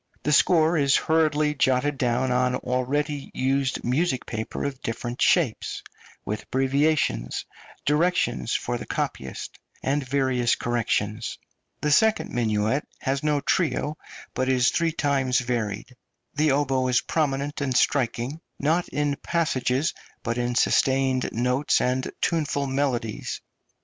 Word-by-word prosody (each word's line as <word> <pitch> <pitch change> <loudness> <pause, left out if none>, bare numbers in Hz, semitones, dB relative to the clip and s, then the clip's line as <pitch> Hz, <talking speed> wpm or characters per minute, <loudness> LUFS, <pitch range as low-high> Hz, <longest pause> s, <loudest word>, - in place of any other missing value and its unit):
The 150 - +1
score 160 +3 +4
is 140 -1 +4
hurriedly 155 -2 +2
jotted 135 0 +1
down 125 0 +1
on 125 0 +2
already 140 +4 -1
used 135 0 0
music 130 +2 0
paper 110 0 -4
of 140 -2 -4
different 120 +2 -4
shapes, 155 -11 +1 0.4
with 105 +1 -3
abbreviations, 135 - 0 0.4
directions 150 - +1
for - - -2
the - - -8
copyist, 65 0 -4 0.2
and 140 +2 0
various 130 -2 +1
corrections. 115 -2 -1 0.4
The 150 - +1
second 220 +9 +3
minuet 110 +3 0
has 135 -1 -1
no 150 -1 +1
trio, 155 -3 0 0.4
but 130 +1 -1
is 125 -1 +3
three 165 -1 +1
times 140 -5 +1
varied. 120 -1 -2 0.4
The 155 +1 +2
oboe 135 -2 +1
is 125 -1 +3
prominent 145 -2 -1
and 130 -3 +1
striking, 130 +3 0 0.2
not 165 +5 +1
in 145 -1 -1
passages, 150 -3 0 0.3
but 115 +1 -1
in 120 0 -1
sustained 130 0 +2
notes 125 +4 +1
and 130 +1 0
tuneful 150 -4 0
melodies. 130 -5 -2
135 Hz, 125 wpm, -25 LUFS, 125-145 Hz, 0.4 s, score